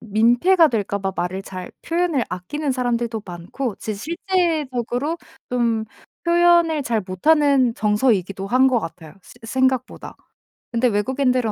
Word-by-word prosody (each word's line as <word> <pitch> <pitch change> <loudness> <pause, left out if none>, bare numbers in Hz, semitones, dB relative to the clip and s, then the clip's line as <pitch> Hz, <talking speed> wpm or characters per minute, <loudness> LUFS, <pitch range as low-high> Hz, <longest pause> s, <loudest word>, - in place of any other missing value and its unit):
민폐가 240 - +4
될까 205 -3 -2
봐 195 -1 -3
말을 180 +2 -2
잘 185 -2 -8
표현을 335 -6 0
아끼는 270 +11 -3
사람들도 235 -3 -1
많고 185 +7 -5
진짜 215 -2 -5
실제적으로 315 - -1 0.3
좀 235 -3 0 0.4
표현을 340 -3 +4
잘 230 -4 -1
못하는 270 - +3
정서이기도 210 -3 +1
한 255 +5 +4
것 250 -3 +2
같아요, 160 -2 -8
새 - - -16
생각보다. 260 +1 -1 0.6
근데 240 +1 +2
외국인들은 250 +2 +1
245 Hz, 300 characters per minute, -21 LUFS, 210-290 Hz, 0.6 s, 민폐가